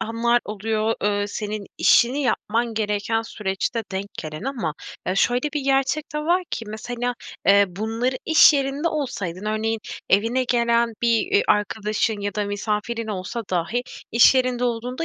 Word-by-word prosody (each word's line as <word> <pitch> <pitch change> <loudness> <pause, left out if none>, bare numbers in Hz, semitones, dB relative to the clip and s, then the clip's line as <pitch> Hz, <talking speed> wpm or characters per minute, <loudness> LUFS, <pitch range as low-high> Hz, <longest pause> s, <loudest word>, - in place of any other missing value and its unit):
anlar 235 +2 +1
oluyor, 215 +1 -1
eee, 205 0 +1
senin 210 0 -4
işini 255 +5 +4
yapman 235 -2 0
gereken 215 +1 0
süreçte 210 +2 -3
denk 190 +1 -3
gelen 155 -1 -6
ama 235 - -3 0.3
ya, 185 - 0
şöyle 245 +7 +2
bir 295 - 0
gerçek 275 +3 0
de - - 0
var 345 +5 +1
ki 230 - -4
mesela, 245 +3 -3 0.3
eee, 200 0 +7
bunları, 225 +7 -2
iş 320 -1 +7
yerinde 280 +3 0
olsaydın, 210 - -4
örneğin 220 +1 -1 0.3
evine 230 +6 +2
gelen 235 -1 +2
bir, 235 -1 +4
eee, 405 +2 +5
arkadaşın 210 +1 0
ya 205 -1 -3
da 210 -1 -1
misafirin 210 +3 -2
olsa 200 +3 -4
dahi 185 +7 0 0.3
i̇ş 235 +3 +7
yerinde 255 -1 +1
olduğunda 245 +5 -2
225 Hz, 150 wpm, -23 LUFS, 210-250 Hz, 0.3 s, eee